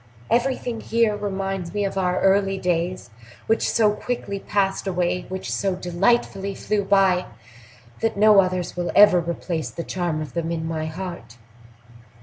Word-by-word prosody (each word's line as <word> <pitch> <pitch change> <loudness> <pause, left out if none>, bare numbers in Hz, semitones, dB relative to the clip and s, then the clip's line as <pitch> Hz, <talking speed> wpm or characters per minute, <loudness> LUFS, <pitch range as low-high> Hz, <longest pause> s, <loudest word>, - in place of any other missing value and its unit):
Everything 245 -2 0
here 230 -2 +1
reminds 195 -3 -4
me 205 -1 0
of 195 - -3
our 185 -1 0
early 195 0 +3
days, 175 -6 -2 0.3
which 225 - +1
so 215 -2 +3
quickly 210 -2 -4
passed 195 -1 -1
away, 180 -1 -1
which 190 0 -4
so 195 -2 0
delightfully 195 +2 0
flew 210 -1 -1
by, 195 -2 +3 0.7
that 225 -2 -1
no 210 0 +6
others 185 -2 0
will 175 -1 -2
ever 205 -3 +7
replace 170 -1 -3
the 170 - -6
charm 175 -4 -2
of 150 -4 -6
them 165 -1 -2
in 160 -1 -3
my 160 -1 -3
heart." 160 -9 -7
190 Hz, 150 wpm, -23 LUFS, 175-205 Hz, 0.7 s, ever